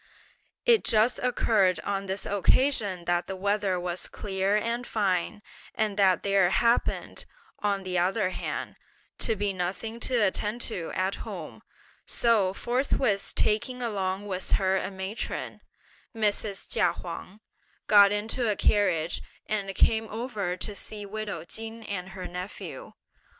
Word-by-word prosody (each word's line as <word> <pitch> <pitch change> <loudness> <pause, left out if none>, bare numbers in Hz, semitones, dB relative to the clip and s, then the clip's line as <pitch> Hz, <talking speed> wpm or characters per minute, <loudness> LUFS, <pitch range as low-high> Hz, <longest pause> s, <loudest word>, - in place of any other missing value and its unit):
It 470 -3 +5
just 220 +3 +3
occurred 215 -7 +2
on 195 -1 -2
this 190 +1 -2
occasion 205 -3 +2
that 175 0 +1
the 190 - -4
weather 200 -1 0
was 175 0 -3
clear 195 0 -1
and 230 +3 -1
fine, 205 0 0 0.3
and 215 -2 0
that 190 -3 +4
there 195 -2 +4
happened, 235 +5 +1 0.3
on 200 -2 0
the 180 -1 0
other 185 +2 +1
hand, - - -4 0.4
to 225 - +1
be 205 -1 -1
nothing 195 +6 -3
to 255 - 0
attend 210 +1 +1
to 175 -9 -3
at 190 +1 0
home, - - -7 0.5
so 220 -6 +3
forthwith 240 -1 0
taking 250 +4 +1
along 195 -3 -2
with 185 -2 -3
her 190 -1 +3
a 190 - -1
matron, 190 +2 -5 0.5
(Mrs. 210 -2 0
Chia 170 - +3
Huang) 180 +4 -8 0.5
got 200 -1 +7
into 220 +3 0
a 210 - +2
carriage 180 -6 +2 0.2
and 195 -2 -2
came 220 +3 +3
over 215 -6 -3
to 210 - -4
see 205 +1 -5
widow 205 -5 -4
Chin 225 +5 -5
and 190 -3 -4
her 190 -1 -7
nephew. 185 - -7
200 Hz, 140 wpm, -28 LUFS, 190-220 Hz, 0.5 s, got